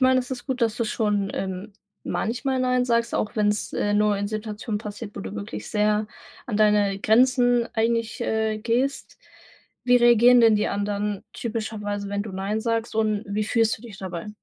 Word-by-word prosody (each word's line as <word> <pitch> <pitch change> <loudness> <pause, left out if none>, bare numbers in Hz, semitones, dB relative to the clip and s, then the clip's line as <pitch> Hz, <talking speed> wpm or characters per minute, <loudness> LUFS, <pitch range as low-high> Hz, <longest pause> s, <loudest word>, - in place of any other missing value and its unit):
meine, 260 0 +5
es 250 - -9
ist 250 0 -5
gut, 260 -3 -2
dass 225 -2 +2
du 235 - -1
schon, 210 -3 0
ähm, 190 +2 -5 0.3
manchmal 260 +4 -2
„Nein“ 250 -1 +1
sagst, 235 -1 +1
auch 215 - -2
wenn's, 210 0 0
äh, 205 - 0
nur 210 0 +3
in 200 0 -2
Situationen 215 0 -4
passiert, 210 0 -8
wo - - -6
du 95 +1 -7
wirklich 105 +1 -6
sehr 210 0 +1 0.4
an 220 -4 -2
deine 210 -2 +3
Grenzen 245 +2 +3
eigentlich, 230 +1 0
äh, 220 -1 0
gehst. 240 +5 -2 0.7
Wie 250 0 +5
reagieren 240 0 +6
denn 225 -2 +6
die 210 - 0
anderen 205 0 -2
typischerweise, 210 -3 -4
wenn 200 0 -2
du 210 -2 -8
„Nein“ 195 +3 -2
sagst? 230 -1 -1
Und 215 -1 +1
wie 210 +1 -1
fühlst 225 +1 +2
du 220 - -19
dich 215 -5 -11
dabei? 185 0 -6
215 Hz, 185 wpm, -24 LUFS, 205-235 Hz, 0.7 s, reagieren